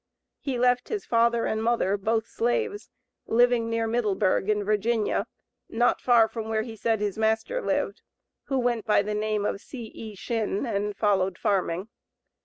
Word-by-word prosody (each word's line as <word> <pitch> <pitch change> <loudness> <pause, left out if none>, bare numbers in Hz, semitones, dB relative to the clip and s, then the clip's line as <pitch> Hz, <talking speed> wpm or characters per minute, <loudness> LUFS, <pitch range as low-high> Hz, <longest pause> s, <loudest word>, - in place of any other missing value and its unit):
He 270 -3 -3
left 250 +1 +2
his 420 -3 -3
father 235 0 +2
and 220 - -1
mother, 225 -4 +1
both 220 +2 0
slaves, 410 - -1 0.4
living 240 0 +3
near 230 0 0
Middleburg, 215 -4 +1
in 210 -1 +2
Virginia, 215 +1 0 0.4
not 240 +2 +2
far 235 -3 +5
from 220 -1 -6
where 220 -1 0
he 225 -1 -8
said 220 0 0
his 205 0 -2
master 220 - 0
lived, - - -1 0.4
who 270 - -1
went 240 -3 0
by 210 -1 +4
the 210 +1 -3
name 210 -1 -1
of 200 - -2
C.E. 225 -4 -9
Shinn, 220 +1 -2
and 205 -3 -2
followed 190 -3 +1
farming. 190 -1 0
225 Hz, 160 wpm, -26 LUFS, 210-240 Hz, 0.4 s, far